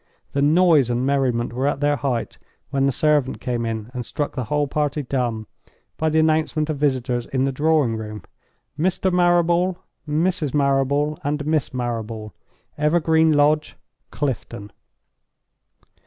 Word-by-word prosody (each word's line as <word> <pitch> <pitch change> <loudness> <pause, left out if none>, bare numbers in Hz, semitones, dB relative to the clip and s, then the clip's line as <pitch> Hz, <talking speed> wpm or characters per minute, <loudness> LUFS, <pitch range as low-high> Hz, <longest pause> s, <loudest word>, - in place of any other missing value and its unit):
The 140 - 0
noise 155 -3 +4
and 120 +1 0
merriment 130 -4 0
were 130 +3 -1
at 145 - -1
their 145 0 +2
height 125 -2 -3 0.3
when 135 0 +2
the - - +2
servant 145 -1 +1
came 120 -2 -2
in, 110 0 -4
and 125 -2 -4
struck 145 +5 -3
the 125 -3 -2
whole 145 +5 0
party 150 0 -1
dumb 120 -4 -2 0.5
by 160 - +1
the 155 - 0
announcement 155 0 +1
of 150 - -4
visitors 130 -4 0
in 130 0 0
the 135 - 0
drawing 145 -4 +2
room. 105 -1 -7 0.6
"Mr. 185 +2 +1
Marrable, 175 0 +3 0.3
Mrs. 155 -2 0
Marrable, 140 +1 +1
and 145 0 -2
Miss 155 -3 0
Marrable; 115 -4 -4 0.5
Evergreen 160 +1 +3
Lodge, 150 +1 +2 0.3
Clifton." 120 -7 -4
145 Hz, 140 wpm, -22 LUFS, 125-155 Hz, 0.6 s, noise